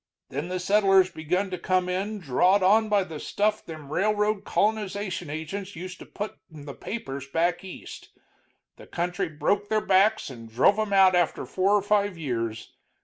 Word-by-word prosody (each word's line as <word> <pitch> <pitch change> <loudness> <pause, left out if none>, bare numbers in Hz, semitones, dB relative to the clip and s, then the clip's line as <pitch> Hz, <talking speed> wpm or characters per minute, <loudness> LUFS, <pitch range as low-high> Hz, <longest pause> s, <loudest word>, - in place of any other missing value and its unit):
Then 145 +5 -4
the 185 0 -3
settlers 195 -1 +4
begun 180 +5 -2
to 180 - -4
come 185 0 +1
in, 195 +4 -2
drawed 185 +4 +2
on 215 +3 +4
by 205 -2 +3
the 160 -4 -8
stuff 210 +6 0
them 155 -3 -9
railroad 210 +1 +1
colonization 200 -5 -1
agents 175 +6 -5
used 180 +2 -8
to - - -11
put 210 +1 -6
in 150 -2 -11
the 140 - -7
papers 140 - -6
back 165 +5 0
East. 190 - -10 0.7
The - - -14
country 180 +1 -2
broke 200 +7 -1
their 215 - +2
backs 195 -2 +3
and 115 -3 -11
drove 135 - +3
'em 215 -1 -1
out 190 -1 +6
after 175 -2 +1
four 195 +2 +2
or 205 - +2
five 205 -2 +1
years. 115 -7 -4
185 Hz, 175 wpm, -26 LUFS, 160-205 Hz, 0.7 s, out